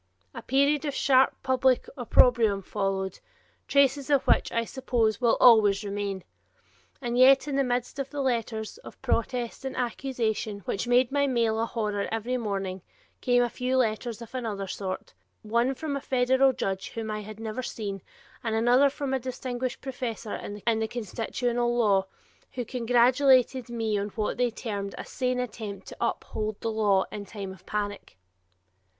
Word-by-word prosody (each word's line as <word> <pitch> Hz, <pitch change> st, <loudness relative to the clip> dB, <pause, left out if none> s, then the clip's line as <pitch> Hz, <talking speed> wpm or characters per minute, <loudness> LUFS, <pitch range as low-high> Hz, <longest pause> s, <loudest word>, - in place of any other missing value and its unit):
A -, -, -7 dB
period 280 Hz, +3 st, +2 dB
of 290 Hz, -3 st, -3 dB
sharp 265 Hz, -1 st, +4 dB
public 260 Hz, -1 st, +2 dB
opprobrium 230 Hz, -5 st, +4 dB
followed, 190 Hz, -1 st, -2 dB, 0.5 s
traces 280 Hz, 0 st, +3 dB
of 280 Hz, -2 st, +3 dB
which, -, -, +3 dB
I 230 Hz, 0 st, 0 dB
suppose, 235 Hz, -4 st, 0 dB
will 235 Hz, -2 st, +3 dB
always 210 Hz, -5 st, +6 dB
remain. 200 Hz, -2 st, -3 dB, 0.8 s
And 240 Hz, 0 st, -1 dB
yet 270 Hz, +2 st, +6 dB
in 285 Hz, -, -2 dB
the 275 Hz, -, +3 dB
midst 245 Hz, +1 st, -2 dB
of 275 Hz, 0 st, -3 dB
the 290 Hz, -, -6 dB
letters 230 Hz, -, -2 dB
of -, -, -13 dB
protest 240 Hz, +2 st, -1 dB
and 265 Hz, -, -5 dB
accusation 230 Hz, -4 st, -2 dB
which 200 Hz, +5 st, -3 dB
made 245 Hz, +1 st, +3 dB
my 280 Hz, 0 st, +2 dB
mail 230 Hz, -4 st, +1 dB
a 230 Hz, -, 0 dB
horror 210 Hz, -4 st, -2 dB
every 225 Hz, +3 st, -1 dB
morning 195 Hz, -5 st, -3 dB, 0.4 s
came 245 Hz, -1 st, +3 dB
a -, -, +1 dB
few 255 Hz, +1 st, -1 dB
letters 235 Hz, -1 st, -1 dB
of 230 Hz, -, -14 dB
another 220 Hz, -6 st, -3 dB
sort, 190 Hz, 0 st, -5 dB, 0.3 s
one 235 Hz, +5 st, +1 dB
from 300 Hz, 0 st, -3 dB
a 280 Hz, -, -3 dB
federal 260 Hz, +1 st, +3 dB
judge 195 Hz, -6 st, -3 dB
whom 225 Hz, -1 st, -5 dB
I 215 Hz, 0 st, -3 dB
had 215 Hz, +1 st, -9 dB
never 225 Hz, +2 st, -4 dB
seen 200 Hz, -5 st, -5 dB, 0.4 s
and 225 Hz, -2 st, -1 dB
another 245 Hz, +5 st, +5 dB
from 275 Hz, -1 st, -4 dB
a 265 Hz, -, +1 dB
distinguished 255 Hz, 0 st, -4 dB
professor 245 Hz, -5 st, -5 dB
in 215 Hz, +2 st, -2 dB
the 220 Hz, -, 0 dB
constitutional 240 Hz, +2 st, -2 dB
law, 200 Hz, -4 st, +3 dB, 0.5 s
who 245 Hz, -2 st, -3 dB
congratulated 250 Hz, +1 st, +3 dB
me 225 Hz, -3 st, -1 dB
on 200 Hz, -, -2 dB
what 215 Hz, -2 st, -1 dB
they 245 Hz, 0 st, +2 dB
termed 205 Hz, -4 st, -5 dB
a -, -, -6 dB
sane 255 Hz, -1 st, -1 dB
attempt 215 Hz, -4 st, -5 dB
to -, -, -11 dB
uphold 215 Hz, -1 st, -2 dB
the 225 Hz, -, -2 dB
law 205 Hz, -3 st, +2 dB
in 205 Hz, -1 st, -6 dB
time 195 Hz, -2 st, -6 dB
of 185 Hz, 0 st, -18 dB
panic. 205 Hz, -, -4 dB
235 Hz, 165 wpm, -27 LUFS, 210-255 Hz, 0.8 s, always